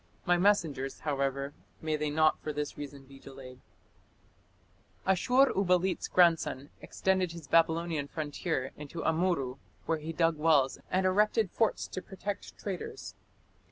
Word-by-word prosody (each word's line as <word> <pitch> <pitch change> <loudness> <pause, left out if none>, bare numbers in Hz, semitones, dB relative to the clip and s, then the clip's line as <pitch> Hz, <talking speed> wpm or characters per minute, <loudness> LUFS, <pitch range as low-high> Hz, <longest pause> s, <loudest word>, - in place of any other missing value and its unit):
My 175 - +4
messengers 165 -8 +1
(however), 140 -1 -1 0.3
may 155 -1 -1
they 150 0 -1
not 155 +1 +2
(for 155 - -3
this 150 0 -4
reason) 140 -1 -8
be 135 0 -15
delayed." 130 -2 -11 1.5
Ashur 250 +9 +4
uballit's 185 -1 +1
grandson 165 -6 +2
extended 185 -3 0
his 170 -3 -9
Babylonian 165 -2 +2
frontier 145 -2 -3
into 150 +2 -7
Amurru, 160 -6 0 0.3
where 165 -1 0
he 155 +2 -5
dug 165 -1 +1
wells 150 -4 +3
and 185 +1 +1
erected 210 +1 +2
forts 225 -2 +1
to 185 - -5
protect 195 +1 -6
traders. 210 - -6
160 Hz, 130 wpm, -30 LUFS, 145-185 Hz, 1.5 s, My